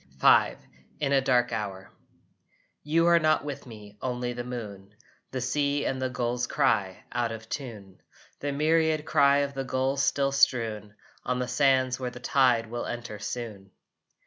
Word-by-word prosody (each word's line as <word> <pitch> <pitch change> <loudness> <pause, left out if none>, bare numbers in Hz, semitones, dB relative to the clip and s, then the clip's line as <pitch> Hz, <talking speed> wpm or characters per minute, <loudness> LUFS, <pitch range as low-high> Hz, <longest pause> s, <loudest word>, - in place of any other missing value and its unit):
V - - +5 0.4
IN 140 -2 0
A 135 - +4
DARK 125 -2 +2
HOUR 100 -4 -5 0.9
You 165 +3 +2
are 170 0 +6
not 155 -2 +2
with 140 -3 -6
me 105 -3 -12
only 125 -1 -2
the 120 0 -5
moon, 105 -5 -8 0.3
The 130 - -4
sea 140 +3 0
and 130 0 -2
the 130 - 0
gulls' 120 -1 -2
cry, 110 -10 0
out 120 -1 -1
of 110 -1 -8
tune; 105 -9 -7 0.4
The 145 - -2
myriad 155 +1 +2
cry 140 -3 +4
of 140 - -8
the 135 -1 -3
gulls 135 +1 0
still 140 0 +1
strewn 115 -7 +1 0.3
On 125 0 -1
the 125 0 -2
sands 130 0 +2
where 125 -1 -2
the 125 - -10
tide 125 -3 +3
will 120 +2 -5
enter 120 -3 -6
soon. 105 -4 -6
125 Hz, 165 wpm, -27 LUFS, 115-140 Hz, 0.9 s, are